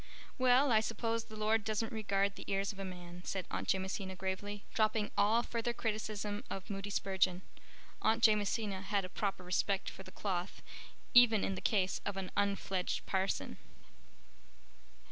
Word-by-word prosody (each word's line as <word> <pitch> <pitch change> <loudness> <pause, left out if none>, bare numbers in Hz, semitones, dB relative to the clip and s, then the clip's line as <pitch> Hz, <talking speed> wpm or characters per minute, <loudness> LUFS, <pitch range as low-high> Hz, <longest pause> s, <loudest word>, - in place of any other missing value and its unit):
"Well, 255 +2 +5
I 220 - +6
suppose 230 +1 -1
the 220 - -11
Lord 215 0 +2
doesn't 220 +1 -1
regard 200 -2 +1
the - - -7
ears 195 +1 +1
of 195 - -13
a - - -3
man," 180 -1 -8
said 190 -1 -3
Aunt - - -3
Jamesina 190 0 -2
gravely, 195 +2 -4
dropping 215 -1 +1
all 215 +4 +4
further 235 0 -2
criticism 215 -1 -2
of 195 +1 -5
Moody 195 0 -4
Spurgeon. 190 -2 +1 0.6
Aunt 225 +1 +2
Jamesina 210 -2 +2
had 195 0 0
a - - -8
proper 195 -2 -2
respect 185 +2 0
for - - -11
the 190 - -10
cloth 185 -2 -3 0.5
even 235 -4 +7
in 195 - 0
the 190 - -5
case 190 -4 +1
of 200 -1 -3
an 190 -1 -4
unfledged 200 -2 0
parson. 190 0 -1
200 Hz, 160 wpm, -34 LUFS, 190-220 Hz, 0.6 s, even